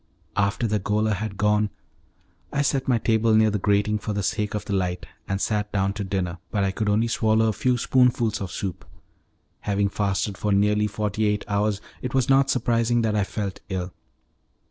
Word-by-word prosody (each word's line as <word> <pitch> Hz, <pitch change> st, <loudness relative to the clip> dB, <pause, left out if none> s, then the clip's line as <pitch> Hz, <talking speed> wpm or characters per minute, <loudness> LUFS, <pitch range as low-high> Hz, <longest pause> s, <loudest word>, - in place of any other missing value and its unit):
After 100 Hz, +3 st, +1 dB
the 105 Hz, -1 st, +1 dB
gaoler 105 Hz, +2 st, +1 dB
had 100 Hz, 0 st, -4 dB
gone, 105 Hz, 0 st, +2 dB, 0.8 s
I 145 Hz, 0 st, +1 dB
set 135 Hz, -2 st, 0 dB
my 125 Hz, -3 st, +3 dB
table 110 Hz, 0 st, +2 dB
near 110 Hz, 0 st, +4 dB
the 105 Hz, -, -1 dB
grating 105 Hz, +2 st, +1 dB
for 105 Hz, -, -3 dB
the 100 Hz, 0 st, -2 dB
sake 105 Hz, +1 st, -1 dB
of 105 Hz, -, -4 dB
the 100 Hz, -, -3 dB
light, 90 Hz, -2 st, -1 dB, 0.2 s
and 95 Hz, 0 st, -1 dB
sat 105 Hz, 0 st, -1 dB
down 100 Hz, -1 st, 0 dB
to 100 Hz, 0 st, -4 dB
dinner, 95 Hz, -3 st, -2 dB
but 100 Hz, -2 st, 0 dB
I 95 Hz, -, +1 dB
could 105 Hz, +2 st, -1 dB
only 110 Hz, +3 st, +2 dB
swallow 110 Hz, -1 st, +2 dB
a -, -, 0 dB
few 125 Hz, +4 st, +1 dB
spoonfuls 120 Hz, -3 st, +2 dB
of 95 Hz, -2 st, -4 dB
soup. 95 Hz, 0 st, -4 dB, 0.8 s
Having 100 Hz, -1 st, 0 dB
fasted 100 Hz, 0 st, -1 dB
for 105 Hz, -1 st, +1 dB
nearly 105 Hz, +1 st, +3 dB
forty 105 Hz, +1 st, -1 dB
eight 105 Hz, 0 st, -1 dB
hours, 105 Hz, 0 st, 0 dB, 0.2 s
it 125 Hz, 0 st, -4 dB
was 130 Hz, 0 st, +2 dB
not 135 Hz, 0 st, +4 dB
surprising 120 Hz, -2 st, +1 dB
that 110 Hz, -1 st, +1 dB
I 105 Hz, -, +2 dB
felt 100 Hz, -1 st, -4 dB
ill. 90 Hz, -2 st, -3 dB
105 Hz, 195 wpm, -24 LUFS, 100-110 Hz, 0.8 s, near